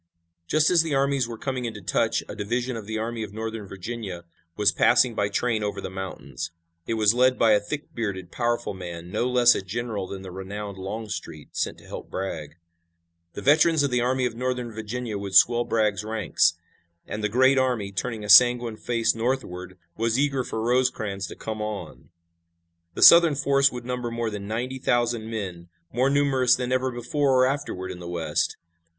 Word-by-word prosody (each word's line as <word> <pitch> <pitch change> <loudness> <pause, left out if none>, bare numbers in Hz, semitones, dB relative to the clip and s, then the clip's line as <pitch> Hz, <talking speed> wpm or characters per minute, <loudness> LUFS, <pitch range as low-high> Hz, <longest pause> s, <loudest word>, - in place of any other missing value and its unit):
Just 155 - +3
as 175 -2 +5
the 160 -3 -1
armies 135 -2 +1
were 115 -1 -7
coming 130 0 -3
into 110 -3 -5
touch 90 - 0
a - - -7
division 120 +4 -2
of 110 -3 -7
the 110 0 -3
Army 115 +1 -3
of 105 -2 -6
Northern 110 -2 -5
Virginia 95 -2 -6 0.3
was 105 -2 +4
passing 120 +2 +4
by 105 -2 0
train 115 +1 0
over 105 - -3
the - - -6
mountains. 95 -3 -6 0.4
It 115 - -1
was 110 -1 +4
led 125 +1 +3
by 115 - +4
a 105 - +5
thick 145 +9 -6
bearded, 95 -6 -4
powerful 120 -2 -1
man, 85 -2 -8
no 125 - 0
less 125 -1 +6
a - - -2
general 105 0 -4
than 95 0 -7
the 95 - -8
renowned 100 +1 -7
Longstreet, 95 -6 -6
sent - - -2
to - - -17
help - - -8
Bragg. 80 -6 -5 0.8
The - - -7
veterans 155 +2 +4
of 140 - 0
the 125 -1 +2
Army 130 +1 +1
of 120 - -1
Northern 125 -1 -3
Virginia 110 0 -4
would 100 -1 -5
swell 120 +4 +6
Bragg's 105 -3 0
ranks, 105 -6 +1 0.5
and 105 +1 -5
the 105 - +1
great 130 +4 +4
army, 120 -6 0
turning 110 +2 -4
a - - -6
sanguine 120 +1 +6
face 115 -1 0
northward, 115 -7 -3 0.2
was 115 +1 +1
eager 135 -2 +1
for 110 -2 -4
Rosecrans 115 -6 0
to - - -9
come 110 -1 -5
on. 105 -7 -6 0.9
The - - +2
Southern 170 -3 +9
force 140 0 +3
would 125 -1 -7
number 125 -1 -3
more 115 -1 -3
than 100 -1 -6
ninety 125 +4 -3
thousand 120 -3 0
men, 90 -6 -5 0.2
more 125 +4 +2
numerous 135 -3 +3
than 125 0 -3
ever 130 0 +1
before 135 +3 0
or 130 - +6
afterward 130 -9 -3
in 90 - -8
the 85 -1 -7
West. 80 -3 -1
115 Hz, 190 wpm, -25 LUFS, 100-125 Hz, 0.9 s, Southern